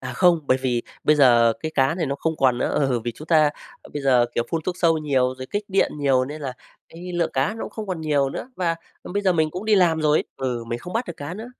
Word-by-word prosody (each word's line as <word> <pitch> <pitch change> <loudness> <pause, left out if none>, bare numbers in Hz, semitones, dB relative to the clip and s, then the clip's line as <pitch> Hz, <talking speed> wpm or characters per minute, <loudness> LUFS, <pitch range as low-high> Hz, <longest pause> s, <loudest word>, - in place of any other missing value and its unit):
À, 125 -1 -6
không, 175 +3 +4
bởi 130 - +3
vì 125 -3 -1 0.2
bây 150 - +4
giờ 120 -4 +5
cái 155 0 -4
cá 135 +2 +2
này 170 -4 -2
nó 140 - -1
không 160 +3 -2
còn 125 -2 +2
nữa. - - 0 0.2
Ừ, 125 -3 0
vì 120 +1 -4
chúng 155 - -11
ta, 155 -3 +4 0.3
ơ, - - -15
bây 145 - -4
giờ, 125 -3 +4
kiểu, 120 - 0
phun 165 -1 -1
thuốc 185 - -2
sâu 165 -2 +3
nhiều 130 -4 +1
rồi 130 - -6
kích 205 +1 -2
điện 195 0 +2
nhiều 135 -3 +2
nên 150 +3 -7
là 135 -3 -4 0.4
cái 180 +2 -9
lượng 175 -1 0
cá 135 +11 0
nó 225 - -6
cũng - - -6
không 215 -1 -6
còn 180 -4 -4
nhiều 145 -3 +1
nữa 255 - -6
và, 170 -3 0 0.3
ừ, - - -8
bây 205 0 -1
giờ 190 - +3
mình 160 -2 +1
cũng 180 +6 -6
đi 215 -1 +3
làm 170 -4 +3
rồi 150 0 +3
ấy - - -2
ừ, 125 -3 -3
mình 120 +1 -4
không 180 - -9
bắt 230 +3 -1
được 170 - -7
cá 145 +5 -6
nữa. 225 +4 -8
155 Hz, 295 wpm, -23 LUFS, 130-175 Hz, 0.4 s, giờ